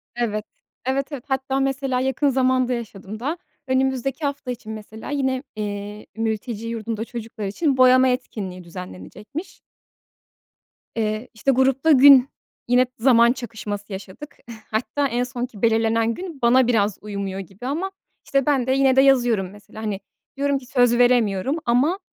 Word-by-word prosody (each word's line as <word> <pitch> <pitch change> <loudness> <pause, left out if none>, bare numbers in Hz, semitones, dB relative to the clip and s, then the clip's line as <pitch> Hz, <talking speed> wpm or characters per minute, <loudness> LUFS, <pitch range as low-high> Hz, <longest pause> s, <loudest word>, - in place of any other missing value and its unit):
Evet. 215 -3 -2 0.4
Evet, 270 +3 -1
evet. 275 -4 -6
Hatta 265 0 -1
mesela 270 -1 0
yakın 265 +2 +1
zamanda 255 -1 +2
yaşadım 215 -3 -6
daha, 290 +8 -2 0.3
önümüzdeki 265 +2 0
hafta 280 -2 -3
için 235 -3 -7
mesela, 220 0 -8
yine, 265 -2 0
eee, 205 0 -5
mülteci 225 0 -3
yurdunda 225 -1 -3
çocuklar 225 -2 -6
için 265 - 0
boyama 255 0 +6
etkinliği 210 -8 -3
düzenlenecekmiş. 180 - -9 1.4
Eee, 215 +1 -1
işte, 235 +5 +1
grupta 270 +4 +3
gün 275 -1 +8 0.4
yine 250 +1 +4
zaman 235 -1 +5
çakışması 215 -4 -6
yaşadık. 195 +10 -9 0.3
Hatta 265 +6 0
en 245 -1 0
sonki 245 -4 -5
belirlenen 225 0 +2
gün 340 -1 -8
bana 245 +1 +5
biraz 210 -4 +2
uymuyor 200 -2 -4
gibi 195 +5 -10
ama, 340 +8 -2 0.3
işte, 275 -2 +1
ben 270 -4 +2
de - - +2
yine 265 -1 +4
de 265 - +7
yazıyorum, 240 -8 +3
mesela, 205 +1 -12
hani, 205 -3 -2 0.4
diyorum 280 0 +1
ki 265 - -10
söz 245 -2 +3
veremiyorum 245 0 +3
ama, 270 +11 +2
245 Hz, 145 wpm, -22 LUFS, 215-265 Hz, 1.4 s, gün